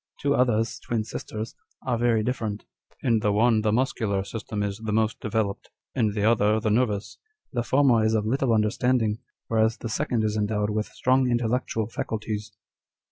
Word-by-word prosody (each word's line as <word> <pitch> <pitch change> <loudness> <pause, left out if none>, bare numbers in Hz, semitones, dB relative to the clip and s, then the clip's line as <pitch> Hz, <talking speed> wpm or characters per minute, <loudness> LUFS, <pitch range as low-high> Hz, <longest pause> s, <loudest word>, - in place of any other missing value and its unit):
Two 140 0 +1
others, 115 -4 +1
twin 115 -2 -2
sisters, 110 +1 -6 0.3
are 125 -2 +1
very 115 -2 +2
dif 125 +4 -1
ferent: 105 -2 -3 0.4
in 115 -3 +3
the 105 -1 +1
one 110 +1 +3
the 105 0 +1
muscular 110 -5 0
system 105 0 -4
is 100 0 -3
the 110 -1 -4
most 110 +1 +1
developed, 105 -2 -2 0.2
in 110 -5 +1
the 105 -1 -1
other 110 -1 +3
the 110 -1 0
nervous. 110 -3 0 0.3
The 120 - 0
former 125 -2 +3
is 110 +1 +2
of 105 -1 +1
little 130 +2 +1
understanding, 110 0 +2 0.3
whereas 110 0 +2
the 115 - -5
second 120 -2 0
is 105 0 0
endowed 105 0 0
with 105 0 -1
strong 130 0 +2
intellectual 120 -1 0
faculties." 110 -1 -4
110 Hz, 175 wpm, -26 LUFS, 105-120 Hz, 0.4 s, in